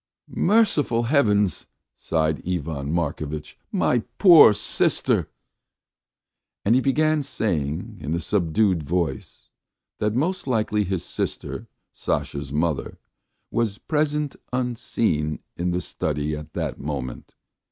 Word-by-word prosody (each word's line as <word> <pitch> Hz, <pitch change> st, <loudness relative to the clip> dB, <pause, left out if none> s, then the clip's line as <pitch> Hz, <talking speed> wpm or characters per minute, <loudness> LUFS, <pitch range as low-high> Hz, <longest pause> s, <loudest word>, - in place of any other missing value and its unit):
"Merciful 150 Hz, -, +3 dB
Heavens!" 105 Hz, -, +2 dB, 0.3 s
sighed 80 Hz, -1 st, 0 dB
Ivan 75 Hz, -5 st, -2 dB
Markovitch. 75 Hz, -2 st, -3 dB, 0.2 s
"My 125 Hz, -, +2 dB, 0.2 s
poor 175 Hz, -, +9 dB
sister!" 105 Hz, -, +1 dB, 1.4 s
And 105 Hz, -, +4 dB
he 130 Hz, -, +4 dB
began 155 Hz, +3 st, +2 dB
saying 85 Hz, -, -2 dB
in 80 Hz, -, -2 dB
a -, -, -1 dB
subdued 90 Hz, +1 st, +1 dB
voice 85 Hz, +3 st, -3 dB, 0.5 s
that 105 Hz, +1 st, 0 dB
most 170 Hz, +5 st, -1 dB
likely 110 Hz, -4 st, +1 dB
his 95 Hz, -2 st, -2 dB
sister, -, -, -4 dB, 0.3 s
Sasha's 70 Hz, -1 st, -3 dB
mother, 75 Hz, 0 st, -1 dB, 0.5 s
was 110 Hz, -4 st, 0 dB
present 150 Hz, 0 st, -1 dB, 0.2 s
unseen 115 Hz, -11 st, -1 dB, 0.2 s
in 90 Hz, +1 st, -1 dB
the 90 Hz, +1 st, 0 dB
study 75 Hz, -2 st, -2 dB
at 75 Hz, +1 st, -9 dB
that -, -, -3 dB
moment. 70 Hz, -4 st, -5 dB
95 Hz, 110 wpm, -24 LUFS, 75-125 Hz, 1.4 s, poor